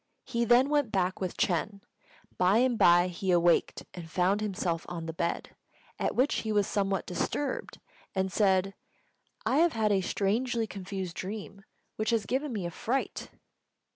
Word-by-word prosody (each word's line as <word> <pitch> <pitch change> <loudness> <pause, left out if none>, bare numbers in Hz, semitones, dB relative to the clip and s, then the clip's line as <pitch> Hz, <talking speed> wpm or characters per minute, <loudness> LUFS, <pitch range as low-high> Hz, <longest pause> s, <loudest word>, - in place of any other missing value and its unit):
He 235 -2 -1
then 245 +4 +5
went 290 -6 +1
back 185 -2 0
with 185 -2 -3
Ch'êng. 200 +3 0 0.6
By 185 +4 +4
and 250 0 +3
by 175 -3 +5
he 185 +2 -4
awaked 175 -1 +3
and 170 -2 -8
found 185 +5 +1
himself 180 -5 -2
on 170 -2 -5
the 160 - -5
bed, 170 +1 -3 0.4
at - - -1
which 260 +4 +2
he 220 - -2
was 205 -1 +3
somewhat 195 -1 -1
disturbed, 290 - -3 0.4
and 190 0 0
said, 195 -1 +2 0.7
"I 265 - +2
have 335 +1 +4
had 220 -2 +1
a 195 -1 +3
strangely 225 +5 0
confused 190 -3 -6
dream, 200 0 -7 0.3
which 215 0 -1
has 225 -3 +1
given 270 +6 -1
me 205 -6 -3
a 175 - -3
fright." 255 +9 -3
200 Hz, 165 wpm, -29 LUFS, 180-230 Hz, 0.7 s, then